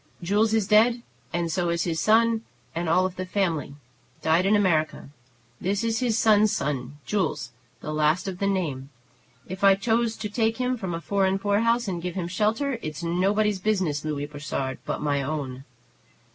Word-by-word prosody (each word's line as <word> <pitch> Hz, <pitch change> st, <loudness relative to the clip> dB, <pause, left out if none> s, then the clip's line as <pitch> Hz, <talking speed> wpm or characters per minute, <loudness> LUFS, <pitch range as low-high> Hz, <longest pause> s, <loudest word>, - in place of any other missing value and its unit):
"Jules 210 Hz, +5 st, +2 dB
is 220 Hz, -3 st, +2 dB
dead, 230 Hz, +3 st, +4 dB, 0.3 s
and 170 Hz, -1 st, -1 dB
so 175 Hz, +1 st, 0 dB
is 170 Hz, -1 st, 0 dB
his 165 Hz, -2 st, -1 dB
son 225 Hz, +4 st, +3 dB, 0.3 s
and 170 Hz, 0 st, -2 dB
all 185 Hz, +3 st, +3 dB
the 185 Hz, 0 st, -6 dB
family, 175 Hz, -7 st, -1 dB, 0.5 s
died 165 Hz, +4 st, +3 dB
in 210 Hz, -, +4 dB
America. 160 Hz, -9 st, +1 dB, 0.5 s
This 195 Hz, +3 st, 0 dB
is 225 Hz, -1 st, 0 dB
his 235 Hz, -3 st, +1 dB
son's 215 Hz, -2 st, +4 dB
son, 140 Hz, -1 st, -3 dB
Jules, 180 Hz, -11 st, -1 dB, 0.3 s
the 155 Hz, -, -4 dB
last 155 Hz, +5 st, +1 dB
of 185 Hz, -2 st, -5 dB
the 200 Hz, -, +1 dB
name. 150 Hz, -9 st, -2 dB, 0.6 s
If 185 Hz, +2 st, -7 dB
I 195 Hz, -1 st, +7 dB
choose 225 Hz, +3 st, 0 dB
to 210 Hz, -, -3 dB
take 225 Hz, +1 st, 0 dB
him 255 Hz, 0 st, 0 dB
from 190 Hz, -7 st, -4 dB
a 165 Hz, -, -5 dB
foreign 195 Hz, 0 st, +1 dB
poorhouse 220 Hz, +4 st, +1 dB
and 175 Hz, -3 st, -3 dB
give 180 Hz, 0 st, -4 dB
him 180 Hz, -3 st, -2 dB
shelter, 220 Hz, +8 st, 0 dB
it's 155 Hz, +2 st, -6 dB
nobody's 195 Hz, +4 st, +1 dB
business, 185 Hz, -8 st, 0 dB
Louis 150 Hz, -2 st, -2 dB
Brossard, 145 Hz, -3 st, -4 dB
but -, -, -2 dB
my 145 Hz, -1 st, +1 dB
own." 135 Hz, -2 st, -4 dB
185 Hz, 175 wpm, -25 LUFS, 155-215 Hz, 0.6 s, I